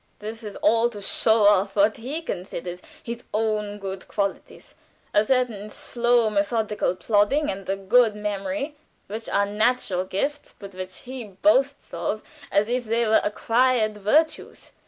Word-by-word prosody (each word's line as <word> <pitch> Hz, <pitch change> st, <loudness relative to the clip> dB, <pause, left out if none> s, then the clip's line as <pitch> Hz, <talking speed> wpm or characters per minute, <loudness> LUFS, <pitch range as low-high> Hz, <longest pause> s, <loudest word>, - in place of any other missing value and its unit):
"This 220 Hz, +2 st, -7 dB
is 210 Hz, -3 st, -8 dB
all 230 Hz, +1 st, +4 dB
to 210 Hz, -3 st, -9 dB
show 220 Hz, +2 st, +2 dB
off 200 Hz, -1 st, +4 dB
what 210 Hz, +1 st, +3 dB
he 280 Hz, +8 st, -4 dB
considers 180 Hz, -, -5 dB, 0.2 s
his 235 Hz, +1 st, -6 dB
own 210 Hz, -1 st, -1 dB
good 195 Hz, -2 st, -6 dB
qualities; 200 Hz, -2 st, -4 dB, 0.4 s
a 210 Hz, -, +5 dB
certain 230 Hz, -4 st, 0 dB
slow, 240 Hz, +1 st, +1 dB
methodical 210 Hz, -1 st, 0 dB
plodding 210 Hz, +9 st, +2 dB
and 195 Hz, -1 st, -7 dB
a 195 Hz, -, +1 dB
good 210 Hz, +3 st, +3 dB
memory, 205 Hz, +6 st, -3 dB, 0.3 s
which 220 Hz, +3 st, -6 dB
are 200 Hz, -, +2 dB
natural 210 Hz, -3 st, 0 dB
gifts, 280 Hz, +11 st, -3 dB
but 200 Hz, -1 st, -10 dB
which 185 Hz, 0 st, -8 dB
he 255 Hz, 0 st, -7 dB
boasts 275 Hz, +7 st, +1 dB
of 175 Hz, +6 st, -2 dB, 0.3 s
as 205 Hz, +1 st, +3 dB
if 245 Hz, +1 st, -1 dB
they 230 Hz, +2 st, +1 dB
were 220 Hz, -, +4 dB
acquired 225 Hz, 0 st, +1 dB
virtues. 310 Hz, +11 st, 0 dB
215 Hz, 150 wpm, -24 LUFS, 200-240 Hz, 0.4 s, a